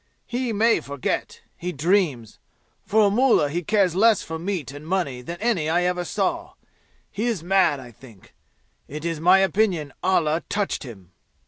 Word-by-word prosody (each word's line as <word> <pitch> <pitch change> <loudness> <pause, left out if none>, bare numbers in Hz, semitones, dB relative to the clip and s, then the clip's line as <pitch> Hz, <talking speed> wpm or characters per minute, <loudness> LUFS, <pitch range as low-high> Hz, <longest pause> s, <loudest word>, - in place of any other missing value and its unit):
He 245 0 -2
may 225 +2 +3
forget. 140 -2 -4
He 180 +1 -5
dreams. 155 - 0 0.5
For 215 0 +4
a 200 - +3
mullah 235 - +3
he 175 +3 -1
cares 195 -1 +2
less 215 +3 +4
for 160 0 -6
meat 175 -6 -3
and 145 +2 -10
money 165 -9 -1
than 170 +8 -7
any 205 -9 0
I 175 +2 +2
ever 180 0 0
saw. - - -2 0.6
He 220 +4 -2
is 215 -9 -2
mad, 180 -5 +2
I 125 -2 -11
think. 115 -4 -17 0.5
It 150 +3 -7
is 165 -2 -2
my 180 +4 +6
opinion 190 -6 +1
Allah 165 -3 +1
touched 205 -1 -1
him!" 95 - -11
175 Hz, 165 wpm, -23 LUFS, 150-200 Hz, 0.6 s, my